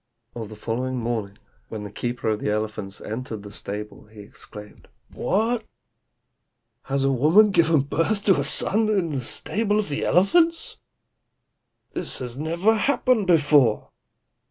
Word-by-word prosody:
"On 115 Hz, -2 st, -5 dB
the 110 Hz, -, -10 dB
following 125 Hz, +4 st, -3 dB
morning, 115 Hz, -4 st, -3 dB, 0.3 s
when 110 Hz, -2 st, -6 dB
the 105 Hz, -, -8 dB
keeper 120 Hz, +2 st, -3 dB
of 105 Hz, -1 st, 0 dB
the -, -, -2 dB
elephants 105 Hz, -2 st, -4 dB
entered 110 Hz, -2 st, -6 dB
the 100 Hz, -, -10 dB
stable, 105 Hz, +1 st, -7 dB
he 105 Hz, -1 st, -13 dB
exclaimed, 105 Hz, +1 st, -12 dB, 0.3 s
'What! 225 Hz, +4 st, 0 dB, 1.2 s
has 135 Hz, 0 st, -1 dB
a 135 Hz, -, +2 dB
woman 160 Hz, -, +5 dB
given 165 Hz, -4 st, +3 dB
birth 165 Hz, +9 st, -1 dB
to 195 Hz, -4 st, +5 dB
a -, -, 0 dB
son 215 Hz, +8 st, +1 dB
in 190 Hz, -6 st, 0 dB
the 135 Hz, -3 st, -2 dB
stable 205 Hz, -, -1 dB
of 210 Hz, -5 st, -1 dB
the 145 Hz, -, -2 dB
elephants? 330 Hz, -, +2 dB, 1.2 s
This 125 Hz, -2 st, -2 dB
never 170 Hz, +9 st, +1 dB
happened 245 Hz, -2 st, +1 dB
before. 145 Hz, -9 st, +3 dB
140 Hz, 140 wpm, -24 LUFS, -, 1.2 s, woman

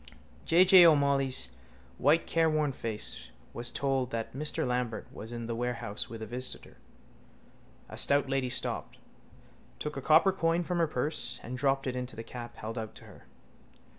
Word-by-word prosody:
_ -, -, -25 dB, 0.4 s
J. 180 Hz, +3 st, +5 dB
J. 185 Hz, -1 st, +9 dB
O'Molloy's 140 Hz, -, +2 dB, 0.5 s
white 160 Hz, +3 st, +3 dB
careworn 155 Hz, -3 st, +1 dB
face 115 Hz, -4 st, -4 dB, 0.2 s
was 120 Hz, 0 st, -1 dB
told 135 Hz, 0 st, -1 dB
that 115 Hz, -2 st, -4 dB
Mr 150 Hz, +3 st, 0 dB
Lambert 125 Hz, -3 st, -2 dB
was 110 Hz, +2 st, -8 dB
in 120 Hz, -1 st, -5 dB
the 115 Hz, 0 st, -3 dB
warehouse 120 Hz, -3 st, -3 dB
with 115 Hz, -1 st, -7 dB
a -, -, -4 dB
visitor. 125 Hz, +4 st, -5 dB, 1.1 s
A -, -, -8 dB
stout 140 Hz, 0 st, +3 dB
lady 135 Hz, -1 st, -1 dB
stopped, -, -, -1 dB, 0.8 s
took 150 Hz, -, -5 dB
a -, -, -3 dB
copper 160 Hz, +7 st, +5 dB
coin 170 Hz, -2 st, 0 dB
from 175 Hz, 0 st, -2 dB
her 165 Hz, -, +3 dB
purse 125 Hz, -3 st, +1 dB
and 125 Hz, -, -6 dB
dropped 135 Hz, +1 st, +1 dB
it 130 Hz, -1 st, -2 dB
into 125 Hz, 0 st, -5 dB
the 115 Hz, -, -6 dB
cap 120 Hz, 0 st, -8 dB
held 115 Hz, +2 st, -5 dB
out 110 Hz, 0 st, -7 dB
to -, -, -13 dB
her. -, -, -16 dB
130 Hz, 170 wpm, -30 LUFS, 120-150 Hz, 1.1 s, J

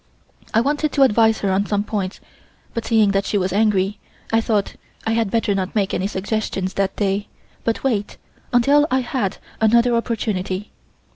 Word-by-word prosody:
I 225 Hz, -, +3 dB
wanted 295 Hz, +3 st, 0 dB
to 280 Hz, -, +5 dB
advise 225 Hz, -3 st, +4 dB
her 195 Hz, -, +1 dB
on 195 Hz, +2 st, +1 dB
some 205 Hz, -1 st, 0 dB
points, 200 Hz, -3 st, -3 dB, 0.5 s
but 230 Hz, -, -3 dB
seeing 220 Hz, -3 st, +4 dB
that 195 Hz, 0 st, +1 dB
she 205 Hz, -, -1 dB
was 185 Hz, -1 st, -1 dB
angry, 205 Hz, -1 st, +2 dB, 0.3 s
I 225 Hz, -, +4 dB
thought 210 Hz, -3 st, 0 dB, 0.3 s
I 225 Hz, -, +1 dB
had 225 Hz, -2 st, +1 dB
better 225 Hz, -1 st, +1 dB
not 190 Hz, 0 st, -3 dB
make 200 Hz, -3 st, +1 dB
any 190 Hz, -, 0 dB
suggestions 195 Hz, -1 st, -2 dB
that 195 Hz, -1 st, -1 dB
day, 200 Hz, 0 st, -1 dB, 0.4 s
but 230 Hz, -, -1 dB
wait 220 Hz, -7 st, -1 dB, 0.3 s
until 280 Hz, +5 st, +4 dB
I 260 Hz, 0 st, +2 dB
had 240 Hz, -6 st, -2 dB, 0.2 s
another 235 Hz, +2 st, +4 dB
opportunity. 210 Hz, -4 st, -2 dB
210 Hz, 170 wpm, -21 LUFS, 195-230 Hz, 0.5 s, to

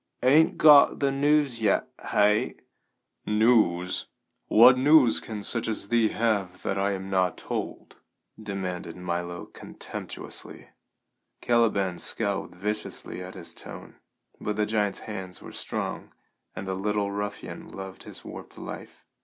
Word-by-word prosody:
"Ain't 150 Hz, +6 st, +5 dB
got 150 Hz, -2 st, +7 dB
the 140 Hz, -1 st, +2 dB
news 140 Hz, -3 st, +2 dB
yet, 105 Hz, -3 st, +2 dB, 0.2 s
hey?" 105 Hz, +1 st, +3 dB, 0.7 s
"News? 105 Hz, -5 st, +2 dB, 0.4 s
What 120 Hz, +3 st, +8 dB
news 135 Hz, -2 st, +5 dB
can 105 Hz, -2 st, -7 dB
such 115 Hz, +1 st, 0 dB
as 110 Hz, -2 st, -3 dB
thee 115 Hz, -2 st, +4 dB
have 100 Hz, -6 st, -1 dB
that 95 Hz, -, -1 dB
I 100 Hz, +1 st, +1 dB
am 95 Hz, 0 st, -6 dB
not 95 Hz, -1 st, +1 dB
told?" -, -, -5 dB, 0.4 s
demanded 95 Hz, -5 st, -5 dB
Milo 85 Hz, -1 st, -4 dB
contemptuously. -, -, -8 dB, 0.7 s
Caliban 100 Hz, -7 st, +1 dB
scowled 100 Hz, -4 st, -2 dB
viciously 105 Hz, -1 st, -4 dB
at 90 Hz, +1 st, -8 dB
his 85 Hz, -3 st, -7 dB
tone, -, -, -10 dB, 0.4 s
but 105 Hz, -, -2 dB
the 105 Hz, 0 st, +1 dB
giant's 105 Hz, -2 st, 0 dB
hands 95 Hz, -4 st, -7 dB
were -, -, -11 dB
strong, -, -, -5 dB, 0.4 s
and 95 Hz, -, -5 dB
the 95 Hz, -, -2 dB
little 100 Hz, +1 st, -1 dB
ruffian 100 Hz, 0 st, -5 dB
loved 95 Hz, -1 st, -9 dB
his -, -, -11 dB
warped -, -, -10 dB
life. -, -, -9 dB
105 Hz, 130 wpm, -27 LUFS, 95-115 Hz, 0.7 s, What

